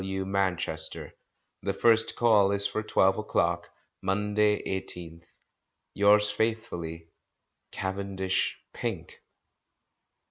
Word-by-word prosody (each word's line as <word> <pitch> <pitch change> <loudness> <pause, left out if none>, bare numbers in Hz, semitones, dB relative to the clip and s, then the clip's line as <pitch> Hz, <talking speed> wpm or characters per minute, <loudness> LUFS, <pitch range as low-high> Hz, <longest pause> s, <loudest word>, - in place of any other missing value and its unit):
W. 95 0 -3
Manchester. 95 -3 -1 0.5
The - - -2
first 115 -1 +3
Call 105 -4 +4
is 100 0 +1
for 100 +2 -1
twelve 95 -2 +2
o'clock, 85 -4 0 0.3
Monday, 105 +2 +1
18th 95 -2 -4 0.2
inst. 85 0 -20 0.4
— - - -54
Yours 105 +1 +4
faithfully, 85 -7 -3 0.6
"Cavendish 95 -1 -2 0.2
Pink." - - -5
100 Hz, 100 wpm, -28 LUFS, 95-105 Hz, 0.6 s, Call